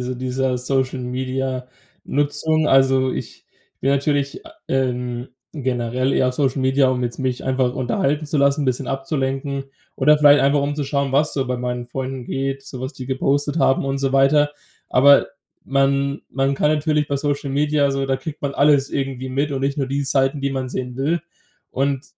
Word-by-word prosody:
dies 125 0 -4
dieser 130 0 -1
Social-Media-Nutzung. 130 +4 -2
Also 135 -1 +4
ich - - -7 0.3
will 135 - +1
natürlich 140 0 0
a 325 - -12 0.2
ähm, 125 -1 -2 0.2
generell 130 -2 -1
eher 130 -1 +2
Social-Media, 130 0 +2
um 125 -1 0
jetzt 120 - -4
mich 130 -2 -2
einfach 130 -1 +1
unterhalten 135 +4 -1
zu 145 0 -1
lassen, 140 +1 +3
bisschen 130 0 -1
abzulenken. 135 0 -2 0.3
Oder 150 +2 +4
vielleicht 145 -1 +7
einfach, 140 +1 +3
um 145 +1 -1
zu 145 - -2
schauen, 140 -1 -1
was 150 +3 +2
so 135 -2 -1
bei 125 0 -1
meinen 125 0 -3
Freunden 130 0 -5
geht, 135 +2 -3
so 130 -2 -8
was 130 +3 -4
die 130 -4 -8
gepostet 140 +3 0
haben 135 0 +3
und 135 0 -1
so 135 -1 -1
weiter. 145 +2 +4 0.4
Aber 140 +2 +5 0.3
man 140 +1 +1
man 135 0 0
kann 150 - +2
natürlich 150 -1 +1
bei 140 - -1
Social-Media 145 +1 0
also, 135 -1 0
da 135 0 0
kriegt 150 +1 -8
man 140 -1 -1
alles 140 -1 +3
irgendwie 135 -2 -3
mit 140 +3 -1
und 135 - -2
nicht 140 +1 -1
nur 135 - 0
die 140 +2 -1
Seiten, 135 +1 +1
die 140 0 -1
man 130 -1 -3
sehen 125 -1 -5
will. 155 +6 0 0.5
Und 135 +1 -1
135 Hz, 175 wpm, -21 LUFS, 130-140 Hz, 0.5 s, vielleicht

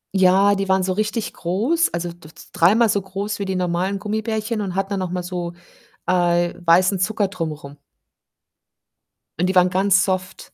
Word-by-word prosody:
Ja, 190 +2 +5
die 195 -1 -2
waren 190 0 +3
so 185 0 0
richtig 215 +2 -2
groß, 230 - 0
also 170 0 -3
d 170 -2 -15
d - - -15 0.2
dreimal 215 +8 +4
so 200 -1 +1
groß 195 +2 -5
wie 200 - -2
die 190 -1 -2
normalen 180 +2 -1
Gummibärchen 220 +1 -3
und 190 -3 -4
hatten 195 +1 -2
dann 200 - -1
noch 185 -1 -3
mal 180 0 -3
so, 175 -1 -5 0.5
äh, 175 -1 +2
weißen 180 +3 +4
Zucker 205 +1 0
drum 170 -4 -4
rum. 145 -1 -10 1.6
Und 180 - +1
die 190 - -1
waren 180 0 +5
ganz 190 0 +3
soft. 185 0 -4
185 Hz, 180 wpm, -21 LUFS, 180-200 Hz, 1.6 s, Ja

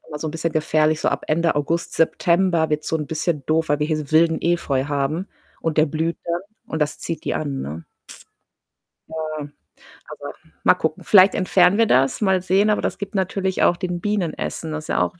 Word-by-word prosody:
immer 150 - -6
so 160 - -4
'n - - -4
bisschen 165 +1 -3
gefährlich. 155 0 +1
So - - +1
ab - - -2
Ende 165 +2 +1
August, 165 +4 -1
September 170 0 +2
wird's 150 0 -1
so 160 - +1
'n 150 -2 -4
bisschen 160 -2 -2
doof, 160 +1 +1
weil 145 0 +2
wir 150 - 0
hier 155 0 0
so 150 -2 -6
wilden 160 +1 +3
Efeu 160 -6 0
haben 145 +6 -2 0.3
und 160 -1 -2
der 155 - +5
blüht 160 +3 -2
dann 170 +1 -1 0.3
und 160 - -4
das 150 - 0
zieht 165 - -5
die - - -1
an, 140 -3 -3
ne? 80 +3 -7 1.2
Ja, 155 -1 -4 0.7
aber, - - -8 0.3
mal - - +6
gucken. - - -3
Vielleicht 195 -1 +6
entfernen 185 0 +3
wir 230 -1 +4
das, 135 - +2
mal 190 -3 +2
sehen, 190 +3 +2
aber 210 - +2
das - - -2
gibt 200 +1 -7
natürlich 190 0 0
auch 175 - +4
den 180 -1 -3
Bienen 200 -3 -1
Essen, 160 - -5
das 155 0 -5
ist - - -11
ja - - +1
auch 175 - -2
160 Hz, 215 wpm, -21 LUFS, 155-180 Hz, 1.2 s, mal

